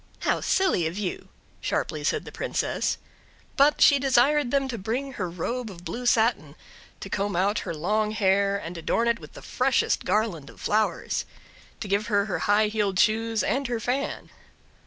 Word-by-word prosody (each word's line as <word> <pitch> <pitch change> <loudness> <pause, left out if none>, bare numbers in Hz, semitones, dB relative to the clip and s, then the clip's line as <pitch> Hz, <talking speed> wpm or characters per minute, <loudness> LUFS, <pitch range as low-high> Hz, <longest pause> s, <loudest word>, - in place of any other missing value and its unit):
"How - - +1
silly 365 - +2
of 170 +4 -5
you!" 200 -4 -4 0.3
sharply - - -2
said - - 0
the - - -9
Princess. - - -1 0.6
But 290 +1 +4
she 280 - +7
desired 270 +1 +3
them 275 +1 +1
to 235 -3 -4
bring 255 +7 -3
her 185 -7 -3
robe 225 +8 -3
of 175 -3 -12
blue 245 +4 -4
satin, 220 -12 +2 0.5
to - - -6
comb 200 0 -2
out 195 +4 +1
her - - -2
long 210 +7 0
hair, 200 -1 +2
and 175 -3 -7
adorn 230 +7 0
it 235 0 +1
with - - -13
the - - -12
freshest 255 0 +1
garland 185 -8 -1
of - - -15
flowers; 215 +1 0 0.6
to 210 - -4
give 200 +3 0
her 205 -2 +2
her 205 - -2
high 210 +1 +5
heeled 205 -3 -1
shoes, 225 +2 +2
and 275 0 0
her 240 -1 -2
fan. 255 +5 -3
215 Hz, 180 wpm, -26 LUFS, 195-245 Hz, 0.6 s, she